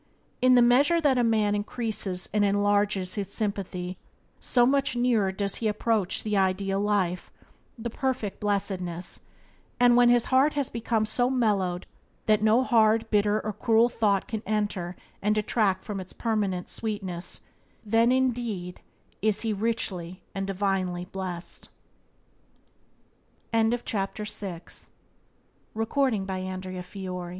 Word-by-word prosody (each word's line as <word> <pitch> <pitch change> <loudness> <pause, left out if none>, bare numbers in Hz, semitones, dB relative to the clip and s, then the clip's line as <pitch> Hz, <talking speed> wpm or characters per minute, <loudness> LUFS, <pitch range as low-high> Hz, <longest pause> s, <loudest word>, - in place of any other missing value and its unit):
In 255 0 +6
the 245 - +7
measure 280 +8 +4
that 280 -5 +3
a - - +3
man 215 -3 +2
increases 205 -3 -2
and 210 -1 +3
enlarges 205 -1 +1
his 200 -2 -4
sympathy 190 -4 -3 0.4
so 245 -2 +3
much 275 0 +2
nearer 235 -5 +2
does 200 +1 -2
he 225 - -1
approach 215 -2 0
the 210 -1 -1
ideal 195 0 +1
life, 200 -4 0 0.5
the 235 0 -5
perfect 255 -6 -2
blessedness; 185 -4 -2 0.6
and 245 -1 +6
when 245 0 +6
his 240 -1 +4
heart 275 +4 +5
has 285 -3 -1
become 225 -1 0
so 245 +3 +1
mellowed 200 -8 0 0.4
that 215 -1 +3
no 220 +4 +4
hard, 225 -2 +3
bitter, 210 0 +3
or 215 - -2
cruel 225 +2 +3
thought 210 -5 +1
can 220 -2 -4
enter 205 -4 -1 0.3
and 210 +1 +2
detract 210 -3 +1
from 205 -2 -5
its 185 -1 -8
permanent 205 -6 -1
sweetness, 195 -6 -4 0.4
then 225 +3 +3
indeed 240 -8 -1 0.4
is 215 0 +1
he 225 -2 0
richly 195 -5 -3
and 195 -1 -3
divinely 190 -2 -1
bless 185 -2 -6
210 Hz, 120 wpm, -27 LUFS, 195-230 Hz, 0.6 s, the